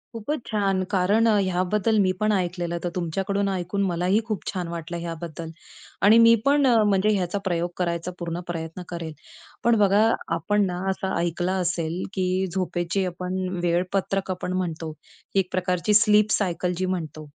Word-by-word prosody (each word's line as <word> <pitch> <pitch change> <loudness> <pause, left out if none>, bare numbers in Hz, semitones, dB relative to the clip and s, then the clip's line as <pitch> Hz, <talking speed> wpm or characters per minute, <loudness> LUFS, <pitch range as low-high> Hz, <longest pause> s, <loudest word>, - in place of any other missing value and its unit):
खूपच 240 +6 -3
छान. 195 -3 +1
कारण 200 +4 +3
अ, 225 - +5
ह्याबद्दल 185 +4 +1
मी 185 -2 +3
पण 215 0 +2
ऐकलेलं 175 -3 -1
तर 175 - -1
तुमच्याकडून 195 +3 -1
ऐकून 190 +1 -2
मलाही 180 +3 +1
खूप 215 -4 -4
छान 180 -3 -3
वाटलं 170 0 -5
ह्याबद्दल. 165 -1 -6 0.5
आणि 210 +3 +7
मी 230 0 +7
पण 285 0 +4
अ, 230 -3 +5
म्हणजे 205 0 +2
ह्याचा 185 +1 -1
प्रयोग 175 -1 0
करायचा 170 0 -2
पूर्ण 170 0 -3
प्रयत्न 165 +1 -5
करेल. 170 -2 -5 0.5
पण 235 0 +4
बघा 205 +2 +5 0.3
आपण 205 -1 +1
ना 180 -2 -3
असं 190 0 -2
ऐकलं 175 +1 -1
असेल 170 0 -1
की 185 0 0
झोपेची 180 0 -1
आपण 185 +1 -3 0.2
वेळपत्रक 185 +2 0
आपण 180 0 -3
म्हणतो 165 -3 -3 0.4
एक 190 -2 +1
प्रकारची 185 +2 0
स्लीप 210 0 +5
सायकल 180 -2 0
जी 185 - 0
म्हणतो. 160 -5 -4
185 Hz, 160 wpm, -24 LUFS, 175-200 Hz, 0.5 s, आणि